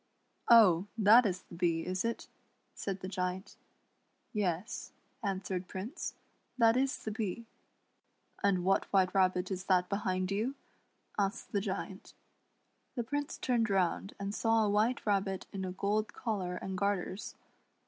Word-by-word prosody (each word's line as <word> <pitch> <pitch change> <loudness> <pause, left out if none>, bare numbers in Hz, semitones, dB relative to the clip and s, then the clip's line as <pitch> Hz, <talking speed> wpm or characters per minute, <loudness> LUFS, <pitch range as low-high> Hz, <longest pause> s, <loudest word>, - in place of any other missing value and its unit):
" - - -44
Oh! 200 -6 +7
that 220 +2 +7
is 180 -1 -3
the - - -16
Bee, 170 -1 0
is 185 0 -1
it? 230 0 -2 0.2
" - - -43
said 195 -1 -4
the 185 - -4
Giant. 185 0 -3 0.4
" - - -44
Yes," 185 +6 -3 0.3
answered 190 -2 -2
Prince, 210 - -5 0.4
"that 230 -1 +5
is 270 +2 +1
the 215 - -3
Bee." 215 +1 -3 0.5
" - - -31
And 190 -3 +3
what 195 +1 +3
White 190 -2 +3
Rabbit 185 -1 +2
is 185 0 -3
that 180 -2 +3
behind 185 -2 -1
you 225 +7 -1 0.2
} - - -40
" - - -11
asked 200 +3 -1
the 200 - +1
Giant. 190 -1 -5 0.8
The 240 - -1
Prince 290 +4 -3
turned 235 -3 +1
round 195 0 0
and 200 0 -3
saw 225 0 +3
a - - +1
White 220 +4 +1
Rabbit 195 -2 0
in 195 -1 -3
a 185 - -3
gold 205 +3 -1
collar 190 -6 -2
and 190 +1 -4
garters. 200 0 -2
195 Hz, 165 wpm, -32 LUFS, 185-220 Hz, 0.8 s, Oh